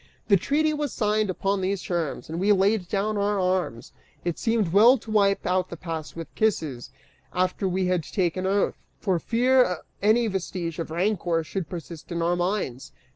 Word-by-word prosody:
The 200 - +7
treaty 300 - +1
was 295 -3 -2
signed 210 -1 +1
upon 195 +1 0
these 190 0 -1
terms, 170 -5 -2
and 165 +2 -4
we 200 +3 +3
laid 195 -1 +2
down 210 +1 0
our 205 0 +1
arms. 180 -11 -1 0.3
It 175 -2 -2
seemed 225 -7 +1
well 235 +6 +7
to 220 -1 -10
wipe 200 -2 +3
out 185 0 +1
the 170 - -7
past 160 -2 -6
with 165 -2 -8
kisses, 155 - -1 0.5
after 185 +2 0
we 185 +1 0
had 180 -1 +1
taken 185 0 -1
oath, 200 +1 0 0.2
for 185 -5 0
fear 245 -4 +2 0.2
any 220 +4 +4
vestige 180 -5 -3
of 165 - -3
rancor 175 -1 0
should 170 0 -4
persist 170 -1 -8
in 170 -1 -1
our 175 +1 +2
minds. 175 -8 -2
185 Hz, 180 wpm, -25 LUFS, 170-210 Hz, 0.5 s, The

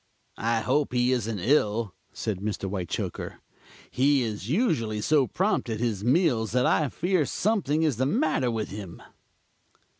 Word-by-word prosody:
"I 115 0 +1
hope 140 +2 0
he 125 0 +2
isn't 115 -4 -1
ill," 105 - +1 0.2
said 105 -4 -3
Mr. 105 +1 -4
Whitechoker. 95 -3 -4 0.5
"He 135 0 +3
is 110 -2 -4
usually 140 - +1
so 140 +3 +3
prompt 190 - 0
at 110 -1 -2
his 110 -4 -1
meals 125 - +2
that 125 0 +3
I 150 -3 +2
fear 175 +4 +1
something 160 -2 0
is 150 -8 +1
the 130 +2 +1
matter 155 - +1
with 110 -2 -2
him." 100 -4 -8
125 Hz, 150 wpm, -26 LUFS, 110-150 Hz, 0.5 s, He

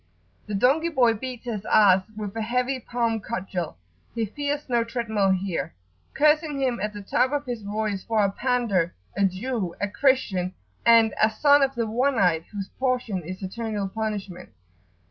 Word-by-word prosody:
The 210 - -3
donkey 280 +11 +3
boy 250 -7 +3
beats 250 +2 -7
his 215 -4 -4
ass 190 -3 +5 0.2
with 210 -1 -5
a 225 - -2
heavy 250 +4 0
palm 235 -2 -1
cudgel, 185 -4 -4 0.4
he 230 -1 0
fears 290 +6 -3
no 240 -2 +2
treadmill 230 -4 0
here, 190 - -1 0.4
cursing 300 0 +3
him 255 -4 0
at 210 +2 -2
the 205 -1 -8
top 250 +6 +1
of 290 0 -1
his 240 -3 -4
voice 205 -1 -2
for 220 -2 +2
a 195 - 0
"pander," 230 -8 0 0.2
a 200 +1 +3
"Jew," 195 -1 -2
a 205 - 0
"Christian," 200 -6 +1 0.3
and 230 -1 +6
a 215 - +6
"son 285 +5 +4
of 270 0 +1
the 235 -1 0
One 250 +4 +1
eyed, 170 -5 +2
whose 200 -2 -5
portion 250 -7 0
is 185 +4 -8
Eternal 210 0 -3
Punishment." 200 -4 -4
220 Hz, 170 wpm, -25 LUFS, 195-250 Hz, 0.4 s, and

